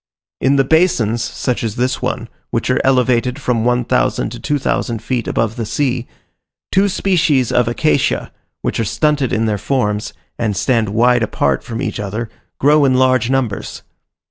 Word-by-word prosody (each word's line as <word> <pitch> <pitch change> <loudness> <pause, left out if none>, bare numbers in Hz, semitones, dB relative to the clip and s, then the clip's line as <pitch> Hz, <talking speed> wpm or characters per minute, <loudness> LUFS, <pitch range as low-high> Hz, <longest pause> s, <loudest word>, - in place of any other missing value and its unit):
In 135 +2 +2
the 135 - +4
basins, 125 - +2
such 125 -2 -2
as 110 -2 -2
this 125 +2 -1
one, 125 -2 -2 0.2
which 115 +2 -1
are 130 - +2
elevated 125 0 +2
from 125 -5 0
one 125 0 +1
thousand - - 0
to - - -7
two 145 - -1
thousand 120 -4 -2
feet 120 -1 -2
above 115 0 -1
the 115 - -2
sea, 125 0 -1 0.6
two 195 +2 +3
species 160 - +1
of 125 -2 +2
acacia, 135 +3 0 0.3
which - - -1
are - - +2
stunted 145 +3 0
in 115 0 +1
their 105 -2 -1
forms, 105 -3 -1 0.3
and 105 -4 -1
stand 115 -3 +1
wide 120 +3 +3
apart 110 - 0
from 115 +3 -5
each - - -3
other, 105 +3 -4 0.3
grow 150 +2 +4
in 130 -2 +3
large 130 -2 +3
numbers. 130 -6 -2
125 Hz, 170 wpm, -17 LUFS, 115-135 Hz, 0.6 s, the